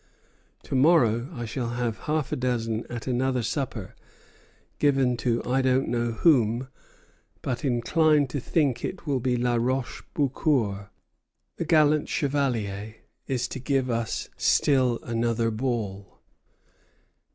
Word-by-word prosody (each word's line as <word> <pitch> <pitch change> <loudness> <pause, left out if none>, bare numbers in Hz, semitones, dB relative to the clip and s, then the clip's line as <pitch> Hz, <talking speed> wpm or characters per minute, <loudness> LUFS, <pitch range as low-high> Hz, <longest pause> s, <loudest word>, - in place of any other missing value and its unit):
To - - -7
morrow 130 -4 +4
I 120 -2 -5
shall 120 +1 -3
have 120 -2 -2
half 150 -3 0
a - - +1
dozen 115 -3 -1
at 120 -1 -6
another 130 -1 0
supper, 120 -5 -3 0.9
given 135 -4 +3
to 120 -1 0
I 130 +2 +1
don't 130 0 +2
know 120 0 0
whom, 125 -3 +3 0.7
but 125 +4 -3
incline 145 +4 +3
to 140 - -3
think 135 -1 0
it 185 - -5
will 140 -4 0
be 125 0 0
La 120 0 +1
Roche 125 +2 -1
Beaucour. 125 -8 0 0.7
The 170 - -2
gallant 155 -2 +3
Chevalier 115 -8 -1 0.3
is 125 -2 -1
to - - -5
give 130 -1 0
us 115 -1 -2
still 130 -4 +3
another 115 0 0
ball." 110 -5 -3
125 Hz, 130 wpm, -26 LUFS, 115-135 Hz, 0.9 s, morrow